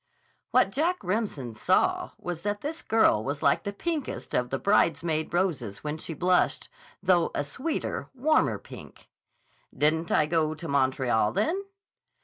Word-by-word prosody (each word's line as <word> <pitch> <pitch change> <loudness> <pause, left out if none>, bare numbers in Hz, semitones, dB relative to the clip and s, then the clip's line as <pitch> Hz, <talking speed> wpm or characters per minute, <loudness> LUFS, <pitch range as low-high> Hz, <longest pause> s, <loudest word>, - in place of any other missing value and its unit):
What 250 -6 +3
Jack 340 - 0
Remsen 185 - -2
saw 110 - +1
was 175 -2 -5
that 205 +1 -2
the 315 +3 -5
girl 220 - +4
was 140 +3 -4
like - - +3
the 200 - -4
pinkest 310 +7 -4
of 125 0 +1
the 135 - -1
bridesmaid 160 -4 +1
roses 155 - -1
when 150 +1 -3
she 165 - -5
blushed, 180 +2 +1 0.3
though 180 -3 +3
a 145 - 0
sweeter, 260 - -3
warmer 305 +5 +2
pink. - - -13 0.7
"Didn't 160 +2 +1
I 155 - +4
go 155 -1 0
to 165 +2 -7
Montreal, 130 -6 +1
then?" 380 - 0
170 Hz, 145 wpm, -27 LUFS, 145-215 Hz, 0.7 s, girl